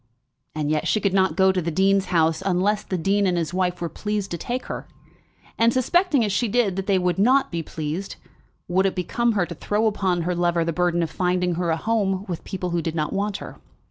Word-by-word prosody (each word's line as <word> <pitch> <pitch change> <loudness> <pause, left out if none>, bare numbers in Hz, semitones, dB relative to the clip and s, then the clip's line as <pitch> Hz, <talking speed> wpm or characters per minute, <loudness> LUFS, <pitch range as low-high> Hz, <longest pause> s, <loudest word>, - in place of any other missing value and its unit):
And 150 -1 -1
yet 155 -1 0
she 215 - +2
could 200 -2 0
not 190 -4 +2
go 190 0 +4
to 185 -1 -1
the 170 - -2
dean's 195 +3 +2
house 165 -2 +1
unless 195 +2 +1
the 185 - -3
dean 195 +4 +1
and 180 -1 +1
his 165 -1 -2
wife 180 -1 0
were 170 - -2
pleased 210 +2 -3
to 170 - -2
take 245 +7 -3
her; - - -6 0.7
and, 230 +1 +5
suspecting 285 - +2
as 205 - -1
she 235 +4 +1
did, 210 -4 +1
that 195 0 -4
they 195 -2 +3
would 180 0 0
not 260 +6 +3
be 170 -1 -2
pleased, 160 +4 -5 0.5
would 190 +2 +2
it 190 - -3
become 230 +6 0
her 195 -4 +1
to 170 - -7
throw 210 +6 -1
upon 190 -5 0
her 180 +2 -1
lover 175 -1 +1
the 170 - -1
burthen 175 0 +1
of 165 - -4
finding 180 -1 0
for 170 - -4
her 175 -2 0
a 160 - +1
home 200 -1 0
with 175 -3 -5
people 185 -2 -4
who 170 0 0
did 165 0 -3
not 155 -2 -1
want 200 +1 -1
her? - - -10
185 Hz, 240 wpm, -23 LUFS, 170-205 Hz, 0.7 s, and